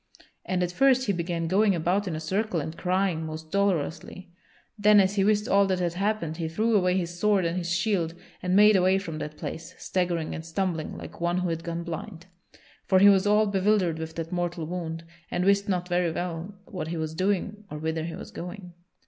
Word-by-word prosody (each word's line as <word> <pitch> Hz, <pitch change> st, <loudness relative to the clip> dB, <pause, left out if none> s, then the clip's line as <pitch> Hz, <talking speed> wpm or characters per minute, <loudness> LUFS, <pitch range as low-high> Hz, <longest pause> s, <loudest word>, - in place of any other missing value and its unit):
And 180 Hz, -1 st, 0 dB
at 175 Hz, -, -1 dB
first 260 Hz, +4 st, +3 dB
he 200 Hz, -, +1 dB
began 170 Hz, -1 st, -2 dB
going 200 Hz, +2 st, +3 dB
about 180 Hz, +5 st, 0 dB
in 170 Hz, -, -2 dB
a -, -, -3 dB
circle 190 Hz, +3 st, -1 dB
and 160 Hz, +2 st, -5 dB
crying 180 Hz, -2 st, 0 dB
most 155 Hz, 0 st, -7 dB
dolorously. 185 Hz, -1 st, -1 dB, 0.4 s
Then 210 Hz, -1 st, +6 dB
as 190 Hz, 0 st, +3 dB
he 200 Hz, -2 st, +2 dB
wist 210 Hz, +1 st, +2 dB
all 200 Hz, 0 st, +4 dB
that 190 Hz, -1 st, +1 dB
had 175 Hz, -2 st, -1 dB
happed 190 Hz, -4 st, -1 dB
he 165 Hz, -2 st, -2 dB
threw 220 Hz, +8 st, +1 dB
away 180 Hz, -2 st, +3 dB
his 175 Hz, -1 st, -3 dB
sword 205 Hz, -3 st, +3 dB
and 165 Hz, +1 st, -1 dB
his 175 Hz, -1 st, -2 dB
shield, 175 Hz, -2 st, 0 dB, 0.3 s
and 180 Hz, 0 st, 0 dB
made 210 Hz, +1 st, +7 dB
away 185 Hz, 0 st, +4 dB
from 165 Hz, -5 st, -5 dB
that 150 Hz, 0 st, -6 dB
place, 165 Hz, 0 st, -7 dB
staggering 175 Hz, -3 st, -1 dB
and 160 Hz, -, -5 dB
stumbling 165 Hz, -1 st, -2 dB
like -, -, -10 dB
one 175 Hz, +1 st, +1 dB
who 180 Hz, -1 st, 0 dB
had 165 Hz, 0 st, -3 dB
gone 170 Hz, 0 st, -4 dB
blind; 170 Hz, +1 st, -7 dB, 0.6 s
for 190 Hz, -, +4 dB
he 200 Hz, +2 st, +8 dB
was 195 Hz, 0 st, +4 dB
all 210 Hz, +1 st, +4 dB
bewildered 195 Hz, -4 st, +1 dB
with 160 Hz, 0 st, -6 dB
that 165 Hz, 0 st, -5 dB
mortal 175 Hz, -2 st, -2 dB
wound, 165 Hz, -1 st, -5 dB, 0.3 s
and 180 Hz, +1 st, -1 dB
wist 200 Hz, +1 st, +3 dB
not 180 Hz, -2 st, 0 dB
very 175 Hz, -1 st, +1 dB
well 175 Hz, +3 st, -4 dB
what 190 Hz, -8 st, -5 dB
he 165 Hz, +1 st, -3 dB
was 160 Hz, 0 st, -3 dB
doing 200 Hz, +4 st, -1 dB
or 150 Hz, -, -6 dB
whither 160 Hz, +1 st, -2 dB
he 165 Hz, -, -5 dB
was -, -, -9 dB
going. 180 Hz, 0 st, -8 dB
180 Hz, 215 wpm, -27 LUFS, 165-200 Hz, 0.6 s, he